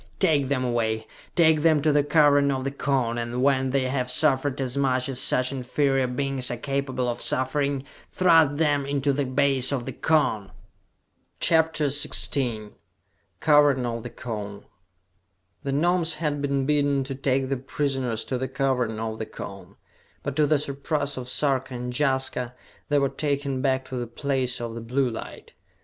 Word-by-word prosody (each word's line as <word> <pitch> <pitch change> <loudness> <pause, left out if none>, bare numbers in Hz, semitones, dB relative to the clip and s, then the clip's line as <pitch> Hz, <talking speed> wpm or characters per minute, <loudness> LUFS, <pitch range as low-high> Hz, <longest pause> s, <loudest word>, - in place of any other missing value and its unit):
"Take 150 -7 +2
them 130 -1 0
away! 110 -2 -1 0.3
Take 160 -3 +4
them 160 -1 +4
to 155 - +4
the 145 0 +3
Cavern 145 -1 +4
of 135 -1 -1
the 135 - -2
Cone, 130 -5 -1
and 120 +2 -2
when 135 -1 +2
they 135 0 +1
have 130 -1 -1
suffered 140 -1 +2
as 130 -1 -2
much 130 -2 +1
as 130 -2 -1
such 130 0 +2
inferior 135 0 0
beings 130 0 -1
are 120 - -3
capable 135 -1 -2
of 120 - -3
suffering, 140 +1 0 0.3
thrust 165 -5 +4
them 145 -3 +2
into 140 0 0
the 140 -1 -1
base 135 0 +2
of 130 -4 -2
the - - -4
Cone!" 130 -11 +1 0.9
CHAPTER 160 -2 +2
XVI 130 -5 0 0.7
Cavern 145 -4 +4
of 115 -1 -3
the 120 - -7
Cone 105 -4 -7 1.0
The 140 - -3
Gnomes 170 +3 +1
had 150 -2 -2
been 140 -1 0
bidden 145 -1 +2
to 135 +1 -5
take 135 0 0
the 135 - 0
prisoners 130 -3 -2
to 130 - -3
the 130 - -2
Cavern 130 -5 -1
of 110 0 -4
the 110 - -4
Cone, 100 -1 -9 0.5
but 140 - -3
to 150 -1 +3
the 150 - +3
surprise 140 +1 -2
of 125 -1 -5
Sarka 130 -2 0
and 125 0 -5
Jaska, 130 -3 -1 0.3
they 145 - +3
were 140 -1 +3
taken 140 -2 -2
back 130 -1 0
to 130 - -4
the 120 -1 -3
Place 130 0 -2
of 115 -1 -5
the 115 - -6
Blue 125 +2 0
Light! 115 - -9
135 Hz, 170 wpm, -25 LUFS, 125-145 Hz, 1.0 s, Take